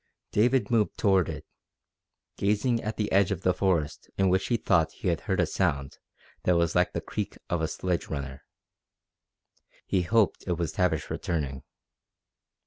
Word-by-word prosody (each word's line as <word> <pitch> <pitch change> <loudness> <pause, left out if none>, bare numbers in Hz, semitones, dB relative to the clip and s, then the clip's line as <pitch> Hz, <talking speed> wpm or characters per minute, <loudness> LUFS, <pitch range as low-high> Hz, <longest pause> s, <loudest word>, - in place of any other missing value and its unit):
David 120 0 +2
moved 110 -3 +2
toward 95 -4 +3
it, - - -6 0.9
gazing 105 +4 +1
at 110 +1 -4
the 105 - -1
edge 100 -1 +4
of 95 -3 -2
the 90 - +3
forest 85 -5 -1
in 95 -1 +3
which 95 +1 +1
he 120 - +2
thought 85 -7 +2
he - - -2
had - - 0
heard - - -1
a - - +4
sound 70 -1 -1 0.4
that 90 -1 +3
was 85 -1 +1
like - - +2
the - - -2
creak - - -4
of 85 -2 +1
a 80 - +1
sledge 90 +1 -2
runner. 70 -3 -5 1.4
He 95 - +1
hoped 110 +3 +2
it 90 - +1
was 85 -2 -1
Tavish 90 -5 0
returning. 70 -6 -2
90 Hz, 165 wpm, -28 LUFS, 80-105 Hz, 1.4 s, edge